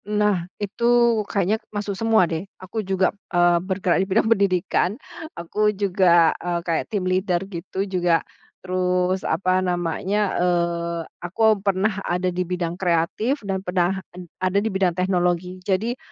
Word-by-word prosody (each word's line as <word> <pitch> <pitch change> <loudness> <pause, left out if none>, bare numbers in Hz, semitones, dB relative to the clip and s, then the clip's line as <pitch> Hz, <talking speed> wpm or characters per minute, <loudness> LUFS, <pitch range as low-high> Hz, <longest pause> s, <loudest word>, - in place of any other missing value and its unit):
Nah, 210 -4 0
itu 235 +2 +2
kayaknya 205 +3 0
masuk 205 -1 -3
semua 220 -1 +3
deh, 165 +3 -4
aku 195 +4 -5
juga, 190 -1 +1 0.2
eee, 175 -1 +4
bergerak 185 -1 0
di - - +1
bidang 220 +3 +2
pendidikan, 185 -3 +1 0.5
aku 210 +5 0
juga, 180 -4 +4
eee, 175 -1 -1
kayak 165 -2 0
team 200 -4 -2
leader 185 0 +1
gitu 190 +1 -4
juga, 175 -4 +1 0.4
terus 180 0 0
apa 185 +3 +1
namanya, 180 +2 -1 0.2
eee, 170 -1 0 0.2
aku 205 +4 +2
pernah 195 +1 0
ada 180 0 -1
di 180 - -1
bidang 180 0 -3
kreatif 190 - 0
dan 190 -1 -2
pernah 185 0 0
ad 180 0 -10 0.2
ada 185 +1 +1
di 220 - -1
bidang 190 -2 +2
teknologi 180 -1 0
jadi 220 +6 0
185 Hz, 145 wpm, -23 LUFS, 175-200 Hz, 0.5 s, eee